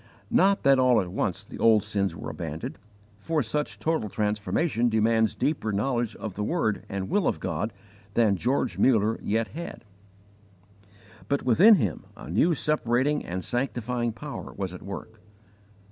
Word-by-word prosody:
Not 195 Hz, +1 st, +3 dB
that 135 Hz, -1 st, +5 dB
all 125 Hz, -2 st, +5 dB
at 90 Hz, -2 st, -3 dB
once -, -, -2 dB
the -, -, -11 dB
old 110 Hz, -3 st, +5 dB
sins 100 Hz, -5 st, -1 dB
were -, -, -6 dB
abandoned, -, -, -6 dB, 0.4 s
for 155 Hz, +5 st, 0 dB
such 150 Hz, +6 st, -2 dB
total 160 Hz, -10 st, -1 dB
transformation 110 Hz, -, 0 dB
demands 110 Hz, 0 st, +2 dB
deeper 145 Hz, -8 st, -1 dB
knowledge 120 Hz, +2 st, -1 dB
of 110 Hz, -4 st, -6 dB
the 105 Hz, -, -3 dB
word 110 Hz, -, 0 dB
and 95 Hz, -1 st, -3 dB
will 205 Hz, -6 st, +1 dB
of -, -, 0 dB
God 95 Hz, +5 st, -2 dB, 0.4 s
than 110 Hz, -4 st, +4 dB
George 125 Hz, +8 st, -1 dB
Muller 110 Hz, -3 st, +3 dB
yet 110 Hz, +2 st, 0 dB
had. 170 Hz, -7 st, -8 dB, 1.4 s
But 140 Hz, 0 st, 0 dB
within 180 Hz, -, +7 dB
him 105 Hz, -, -2 dB
a -, -, -9 dB
new 160 Hz, -, +3 dB
separating 145 Hz, -1 st, +1 dB
and 90 Hz, +1 st, -5 dB
sanctifying 120 Hz, -1 st, -1 dB
Power 140 Hz, +6 st, -7 dB
was 95 Hz, -2 st, -4 dB
at 90 Hz, -, -9 dB
work. 105 Hz, +3 st, -8 dB
115 Hz, 155 wpm, -26 LUFS, 105-140 Hz, 1.4 s, within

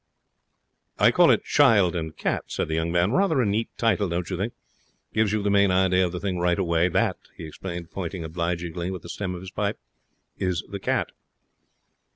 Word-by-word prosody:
'I -, -, +5 dB
call -, -, +5 dB
it -, -, +3 dB
"Child 105 Hz, -11 st, +4 dB
and 80 Hz, -2 st, -4 dB
Cat",' -, -, -1 dB
said -, -, -1 dB
the -, -, -1 dB
young 80 Hz, +1 st, 0 dB
man. 90 Hz, +3 st, +2 dB
'Rather 180 Hz, -2 st, +2 dB
a 125 Hz, -, +3 dB
neat 105 Hz, +3 st, 0 dB
title, 110 Hz, -4 st, +1 dB
don't 85 Hz, +1 st, -2 dB
you -, -, -1 dB
think? 100 Hz, +7 st, -3 dB, 0.6 s
Gives 110 Hz, -2 st, +2 dB
you 105 Hz, -1 st, 0 dB
the 100 Hz, -, +1 dB
main 100 Hz, -1 st, +4 dB
idea 95 Hz, 0 st, +3 dB
of 90 Hz, -, 0 dB
the 90 Hz, -, -4 dB
thing 95 Hz, -2 st, -2 dB
right 90 Hz, 0 st, +2 dB
away. 85 Hz, -2 st, +2 dB
That,' -, -, +1 dB, 0.2 s
he -, -, -8 dB
explained, 85 Hz, +2 st, -7 dB
pointing 90 Hz, -2 st, -5 dB
obligingly 85 Hz, +1 st, -3 dB
with 95 Hz, -3 st, -6 dB
the 85 Hz, -, -10 dB
stem 95 Hz, -1 st, -4 dB
of 90 Hz, -, -8 dB
his 95 Hz, 0 st, -9 dB
pipe, 105 Hz, 0 st, -2 dB, 0.6 s
'is 90 Hz, -3 st, -1 dB
the 100 Hz, -, -6 dB
cat.' -, -, -1 dB
90 Hz, 200 wpm, -25 LUFS, 85-100 Hz, 0.6 s, I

